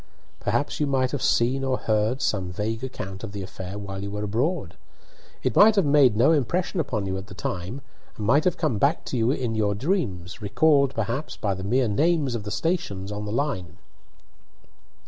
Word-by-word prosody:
"Perhaps 120 Hz, +7 st, -1 dB
you 150 Hz, -, +1 dB
might 130 Hz, -2 st, +1 dB
have 145 Hz, -, -3 dB
seen 130 Hz, +3 st, +2 dB
or 130 Hz, -1 st, +1 dB
heard 110 Hz, +5 st, 0 dB
some 95 Hz, -7 st, 0 dB
vague 110 Hz, +5 st, -3 dB
account 95 Hz, -7 st, -6 dB
of 105 Hz, -3 st, -6 dB
the 100 Hz, -1 st, -4 dB
affair 95 Hz, +1 st, -7 dB
while 95 Hz, -1 st, -6 dB
you 100 Hz, -, -4 dB
were 105 Hz, +1 st, -4 dB
abroad. 125 Hz, -, -1 dB, 0.7 s
It -, -, 0 dB
might 215 Hz, +1 st, +7 dB
have 195 Hz, -, +3 dB
made 140 Hz, -6 st, +5 dB
no 125 Hz, +7 st, +5 dB
impression 170 Hz, -, 0 dB
upon 115 Hz, -10 st, -1 dB
you 95 Hz, 0 st, -2 dB
at 95 Hz, -, -10 dB
the 95 Hz, -, -11 dB
time, 95 Hz, +9 st, -4 dB, 0.4 s
and 105 Hz, -, -4 dB
might 140 Hz, +8 st, +4 dB
have 180 Hz, -1 st, +2 dB
come 150 Hz, -11 st, 0 dB
back 145 Hz, +9 st, +2 dB
to -, -, -4 dB
you 115 Hz, 0 st, +2 dB
in 125 Hz, -4 st, 0 dB
your 105 Hz, -2 st, +1 dB
dreams, 105 Hz, -, -2 dB
recalled 140 Hz, +6 st, +3 dB
perhaps 115 Hz, +7 st, -3 dB
by 100 Hz, -2 st, -1 dB
the 95 Hz, 0 st, -6 dB
mere 125 Hz, +5 st, +2 dB
names 145 Hz, +4 st, +2 dB
of 110 Hz, -3 st, -4 dB
the -, -, -3 dB
stations 105 Hz, -, -2 dB
on 105 Hz, 0 st, -4 dB
the 105 Hz, -, -4 dB
line." 115 Hz, -, -2 dB
115 Hz, 200 wpm, -25 LUFS, 100-140 Hz, 0.7 s, might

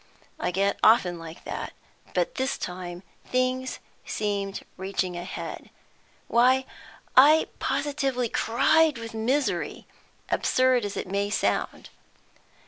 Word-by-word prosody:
I -, -, 0 dB
get 195 Hz, +3 st, 0 dB
often 185 Hz, -6 st, +5 dB
like 165 Hz, 0 st, -10 dB
that, -, -, -5 dB, 0.4 s
but -, -, +1 dB
this 265 Hz, +1 st, -1 dB
time 180 Hz, 0 st, -6 dB, 0.2 s
things 255 Hz, +1 st, -1 dB, 0.3 s
seemed 200 Hz, -2 st, -2 dB
reaching 190 Hz, -1 st, -2 dB
a 175 Hz, -, -4 dB
head. 180 Hz, -, -7 dB, 0.6 s
Why, 255 Hz, +2 st, +4 dB, 0.5 s
I 300 Hz, +5 st, +7 dB
positively 275 Hz, -2 st, 0 dB
cried 295 Hz, +7 st, +3 dB
with 230 Hz, 0 st, -7 dB
misery, 255 Hz, +6 st, -1 dB, 0.5 s
absurd 255 Hz, -3 st, +3 dB
as 205 Hz, -, -4 dB
it -, -, -2 dB
may 200 Hz, +2 st, -1 dB
sound. -, -, -1 dB
230 Hz, 115 wpm, -26 LUFS, 195-260 Hz, 0.6 s, I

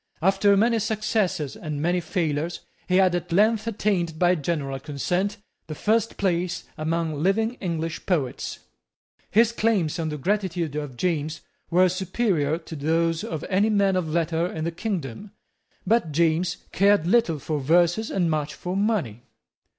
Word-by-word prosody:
After 195 Hz, +3 st, +3 dB
many 230 Hz, +2 st, +3 dB
successes 215 Hz, -, -1 dB
and 150 Hz, -3 st, -5 dB
many 175 Hz, +4 st, +1 dB
failures, 165 Hz, -2 st, -2 dB, 0.3 s
he 180 Hz, -, +1 dB
had 185 Hz, -1 st, +4 dB
at 175 Hz, 0 st, -3 dB
length 215 Hz, +4 st, +3 dB
attained, 195 Hz, -7 st, 0 dB
by 175 Hz, +1 st, +4 dB
general 145 Hz, -4 st, -2 dB
consent, 180 Hz, -, -2 dB, 0.3 s
the 155 Hz, -, -5 dB
first 225 Hz, +4 st, +1 dB
place 180 Hz, -2 st, 0 dB
among 160 Hz, -1 st, -2 dB
living 220 Hz, +6 st, +2 dB
English 165 Hz, -2 st, -3 dB
poets. 150 Hz, -9 st, -1 dB, 0.7 s
His 230 Hz, +2 st, +4 dB
claims 210 Hz, -9 st, 0 dB
on 160 Hz, -1 st, -1 dB
the 150 Hz, -, -4 dB
gratitude 175 Hz, -2 st, -1 dB
of 145 Hz, -4 st, -5 dB
James 160 Hz, -2 st, -1 dB, 0.3 s
were 180 Hz, +2 st, +5 dB
superior 185 Hz, -4 st, 0 dB
to 160 Hz, -1 st, -9 dB
those 165 Hz, +2 st, 0 dB
of 160 Hz, -3 st, -4 dB
any 200 Hz, +3 st, +2 dB
man 200 Hz, -2 st, +3 dB
of 180 Hz, -3 st, 0 dB
letters 165 Hz, +1 st, -1 dB
in 155 Hz, -, -2 dB
the 170 Hz, -, -1 dB
kingdom. 185 Hz, -, -5 dB, 0.5 s
But 200 Hz, -5 st, +2 dB
James 170 Hz, +3 st, +1 dB
cared 200 Hz, -3 st, +3 dB
little 180 Hz, -5 st, +3 dB
for 150 Hz, +1 st, -3 dB
verses 175 Hz, +9 st, +2 dB
and 180 Hz, -3 st, +1 dB
much 150 Hz, -1 st, -2 dB
for 180 Hz, +5 st, -4 dB
money. 195 Hz, -, 0 dB
175 Hz, 150 wpm, -25 LUFS, 155-200 Hz, 0.7 s, were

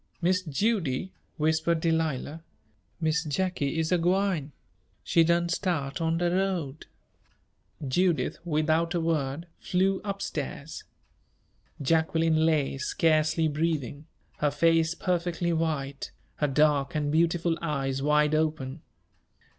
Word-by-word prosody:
"Miss 185 Hz, +1 st, +2 dB
Judy," 185 Hz, -, -1 dB, 0.3 s
whispered 160 Hz, +1 st, +1 dB
Delilah, 160 Hz, -2 st, -1 dB, 0.6 s
"Miss 160 Hz, -1 st, +1 dB
Jacky 160 Hz, -1 st, -1 dB
is 160 Hz, +1 st, 0 dB
a 180 Hz, -, +3 dB
gwine 180 Hz, -4 st, +1 dB, 0.5 s
she 165 Hz, -, +4 dB
done 170 Hz, +1 st, +2 dB
start 170 Hz, -6 st, -2 dB
on 165 Hz, 0 st, +1 dB
de 175 Hz, 0 st, +1 dB
road 180 Hz, -6 st, -2 dB, 0.5 s
" 145 Hz, -, -13 dB
Judith, 175 Hz, +5 st, +1 dB
without 160 Hz, +1 st, +1 dB
a -, -, +2 dB
word, 160 Hz, -2 st, -1 dB
flew 190 Hz, +1 st, +1 dB
up 200 Hz, -1 st, -4 dB
stairs. 145 Hz, +1 st, -5 dB, 0.9 s
Jacqueline 160 Hz, +2 st, +2 dB
lay, 145 Hz, -4 st, +1 dB
scarcely 155 Hz, 0 st, +2 dB
breathing, 150 Hz, -2 st, -2 dB, 0.3 s
her 150 Hz, -, +2 dB
face 165 Hz, +2 st, +2 dB
perfectly 175 Hz, -1 st, -1 dB
white, 150 Hz, -4 st, -2 dB, 0.3 s
her 150 Hz, -, +1 dB
dark 145 Hz, 0 st, +2 dB
and 145 Hz, -1 st, 0 dB
beautiful 165 Hz, +1 st, +2 dB
eyes 135 Hz, -4 st, -2 dB
wide 150 Hz, +1 st, +3 dB
open. 155 Hz, -2 st, -1 dB
160 Hz, 115 wpm, -27 LUFS, 150-170 Hz, 0.9 s, she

